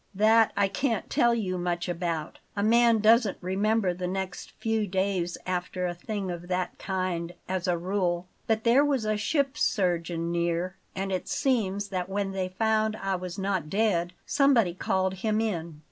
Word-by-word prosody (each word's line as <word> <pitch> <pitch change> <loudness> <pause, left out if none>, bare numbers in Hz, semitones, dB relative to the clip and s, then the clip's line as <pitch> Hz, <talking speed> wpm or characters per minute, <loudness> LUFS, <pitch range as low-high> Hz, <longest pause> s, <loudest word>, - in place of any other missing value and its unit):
"That 220 +2 +5
I 200 -1 +4
can't 225 +2 -1
tell 235 0 +4
you 185 -5 -2
much 175 0 -1
about; 170 -3 -3 0.2
a 200 - 0
man 230 0 +5
doesn't 220 -2 +4
remember 195 +1 +1
the 180 0 -4
next 190 0 -4
few 225 -2 0
days 185 -2 -1
after 180 0 -2
a 175 - -1
thing 195 +1 -4
of 175 0 -7
that 180 0 -2
kind, 180 -3 -2
as 185 0 -2
a 175 -1 +2
rule. 180 -1 -1 0.2
But 220 -1 +1
there 245 +4 +5
was 275 -6 +1
a 215 0 +1
ship's 275 +6 0
surgeon 170 -3 0
near, 170 +2 -1 0.2
and 195 +1 -2
it 185 -1 -2
seems 205 -6 0
that 185 -1 -3
when 195 0 -1
they 190 -1 -2
found 220 +2 +1
I 195 -2 -2
was 180 0 -5
not 190 -5 -1
dead, 185 -4 +1
somebody 245 -10 +3
called 190 +1 0
him 215 -1 +1
in. 170 -8 -3
190 Hz, 175 wpm, -27 LUFS, 180-215 Hz, 0.2 s, That